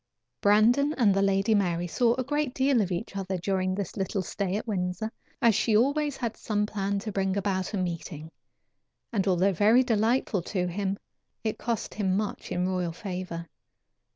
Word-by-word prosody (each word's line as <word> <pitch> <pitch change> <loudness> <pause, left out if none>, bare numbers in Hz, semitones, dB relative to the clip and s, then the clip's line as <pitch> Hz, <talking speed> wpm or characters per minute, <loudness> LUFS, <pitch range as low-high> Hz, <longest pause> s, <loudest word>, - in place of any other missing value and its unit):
Brandon 235 +8 +4
and 215 -6 +4
the 195 - +2
Lady 195 +2 +2
Mary 175 -4 +1
saw 235 +7 +2
a 255 - -1
great 290 -1 -1
deal 265 -3 +3
of 190 -2 -1
each 185 +3 -4
other 190 -1 -2
during 185 +1 0
this 195 -3 -4
little 190 -1 -1
stay 195 +1 -2
at 215 - -3
Windsor, 185 +1 -2 0.3
as 230 -1 +6
she 215 +2 +3
always 285 +5 +1
had 235 -3 -3
some 210 -1 -1
plan 200 -1 -2
to 215 +2 -4
bring 195 0 0
about 190 -1 -1
a 210 - -2
meeting, 165 -3 -4 0.8
and 200 -3 +1
although 190 +1 +3
very 215 +8 +5
delightful 225 -3 +1
to 180 +1 -2
him, 195 +2 -2 0.5
it 220 -1 -2
cost 235 -2 -2
him 190 -3 0
much 210 0 -4
in 180 +1 0
royal 180 -3 -1
favor. 180 -2 -5
200 Hz, 180 wpm, -28 LUFS, 185-225 Hz, 0.8 s, as